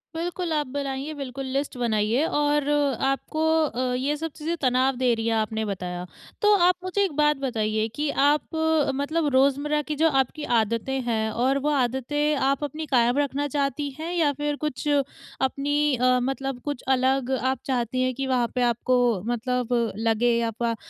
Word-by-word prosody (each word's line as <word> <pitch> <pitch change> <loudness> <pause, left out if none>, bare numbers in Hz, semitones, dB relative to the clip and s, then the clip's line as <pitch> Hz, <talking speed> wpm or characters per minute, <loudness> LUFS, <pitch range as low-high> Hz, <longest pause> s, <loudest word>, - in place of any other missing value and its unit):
बिल्कुल, 350 +1 -3
आप 295 -2 0
बनाइए 275 +2 -4
बिल्कुल 275 -2 -6
लिस्ट 275 -1 -2
बनाइए 230 +3 +1
और 295 -2 +1 0.4
आपको 275 +3 -1 0.2
अ, 250 -1 -2
ये 275 +4 0
सब 325 0 -4
चीज़ें 320 +3 -3
तनाव 260 0 +2
दे 250 -1 +2
रही 225 0 -2
हैं 230 - +2
आपने 220 0 -1
बताया। 180 -3 -4 0.4
तो 420 -1 +5
आप 360 - +4
मुझे 370 +2 0
एक 385 - 0
बात 300 -1 +3
बताइए 220 -4 -1
कि 295 +1 -1 0.2
आप 295 +3 +1 0.4
मतलब 300 +3 0
रोज़मर्रा 280 +3 +2
की 300 +1 -4
जो 325 - +5
आपकी 270 +2 0
आदतें 230 +4 0
हैं 220 -2 0
और 255 +5 +1
वो 295 - 0
आदतें 290 +2 0
आप 275 +1 0
अपनी 305 +2 -4
कायम 245 0 +3
रखना 290 0 0
चाहती 285 0 -1
हैं 325 +2 -4
या 320 -5 +2
फ़िर 295 +1 -2
कुछ 300 +1 -3
अपनी 285 0 0
अ, 250 +1 +3
मतलब 270 0 -3
कुछ 290 -4 -4
अलग 260 0 +1
आप 260 0 0
चाहती 255 -1 -1
हैं 255 0 +1
कि 270 -1 -3
वहाँ 250 -2 +1
पे 250 - +1
आपको 245 +2 +1 0.3
मतलब 250 +1 -1 0.3
लगे 230 +1 +2
आपका 230 +1 -2
270 Hz, 170 wpm, -25 LUFS, 245-295 Hz, 0.4 s, तो